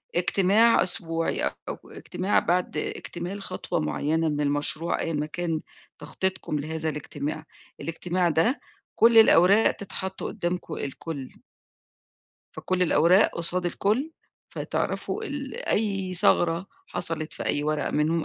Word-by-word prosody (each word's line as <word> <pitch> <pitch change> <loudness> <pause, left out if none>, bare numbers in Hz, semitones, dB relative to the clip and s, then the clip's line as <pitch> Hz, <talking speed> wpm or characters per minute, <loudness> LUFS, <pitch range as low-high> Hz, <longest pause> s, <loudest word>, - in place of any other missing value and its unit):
اجتماع 195 +6 +4
أسبوعي 165 -2 -1
أو - - -3
اجتماع 185 +3 -1
بعد 180 +1 0
اكتمال 180 +4 -4
خطوة 185 -2 -3
معيّنة 160 +1 0
من 150 -1 -1
المشروع 145 +3 -1
أيًا 165 - -2
ما 150 0 -1
كان 165 0 -3 0.4
تخطيطكم 190 -5 -2
لهذا 160 +2 -2
الاجتماع. 150 +1 -5 0.4
الاجتماع 175 +2 -1
ده 165 - +2 0.4
كل 230 0 +5
الأوراق 205 -1 +7
تتحط 190 -1 -6
قُدّامكم 175 +1 -3
الكل. 140 0 -5 1.3
فكلّ 185 0 -1
الأوراق 180 +4 +5
قُصاد 175 +2 +1
الكلّ 220 - 0 0.4
فتعرَفوا 440 - -3
ال 275 - -5
أي 195 -3 0
ثَغرة 170 0 +3 0.2
حصَلِت 165 -3 -3
في - - -6
أي 145 - +1
ورقة 155 0 -1
منهم 155 +2 +1
175 Hz, 120 wpm, -26 LUFS, 155-190 Hz, 1.3 s, الأوراق